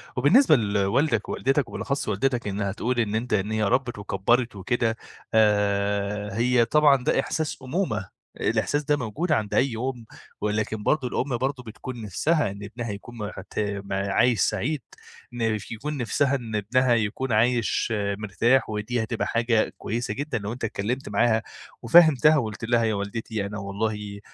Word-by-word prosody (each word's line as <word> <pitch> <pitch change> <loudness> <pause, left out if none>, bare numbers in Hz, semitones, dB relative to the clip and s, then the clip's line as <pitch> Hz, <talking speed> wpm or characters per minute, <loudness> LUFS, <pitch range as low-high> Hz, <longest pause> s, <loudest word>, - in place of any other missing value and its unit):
وبالنسبة 155 - +5
لوالدك 105 +3 +1
ووالدتك 135 +2 0
وبالأخص 140 0 -3
والدتك 125 -4 0
إنها 100 -1 -2
تقول 120 +4 -1
إن 110 -2 0
أنتَ 115 0 -2
إن 105 +1 0
هي 110 0 0
ربت 120 +3 0
وكبرت 105 +4 0
وكده 115 +3 -1 0.4
آآ، 105 -1 +1
هي 120 0 +3
طبعًا 140 -1 +4
ده - - +2
إحساس 155 -1 -2
أمومة. 130 - -3 0.2
الإحساس 145 0 0
ده 145 +1 +1
موجود 145 - -3
عند 110 -8 0
أي 130 -2 +2
أُمّ 125 -1 -4 0.4
ولكن 105 0 -1
برضو 145 -4 +1
الأم 125 0 -1
برضو 130 +1 -2
بتكون 120 +1 -8
نفسها 115 - 0
إن 100 +1 -9
ابنها 115 +2 -5
يكون 115 +4 -9
مت 105 -1 -4
عايش 100 +5 +2
سعيد، 130 +8 0 0.5
نف 115 -3 -2
يكون 145 +7 -4
نفسها 135 +2 +1
إن 115 -5 -5
ابنها 120 +4 +2
يكون 115 +3 -1
عايش 115 +1 +2 0.2
مرتاح، 115 +5 +1
ودي 110 +3 -2
هتبقى 110 +1 -2
حاجة 115 -1 +1
كويسة 120 +3 -3
جدًا 145 -3 -3
لو 105 +1 -4
أنتَ 125 - -9
اتكلمت 110 +5 -2
معاها 110 +1 +2 0.4
وفهمتها، 155 +2 +6
وقلت 110 -4 -3
لها: 120 0 +2
"يا 110 -1 +1
والدتي 100 +1 -3
أنا 105 +1 -5
والله، 100 0 -3
115 Hz, 155 wpm, -25 LUFS, 105-130 Hz, 0.5 s, وفهمتها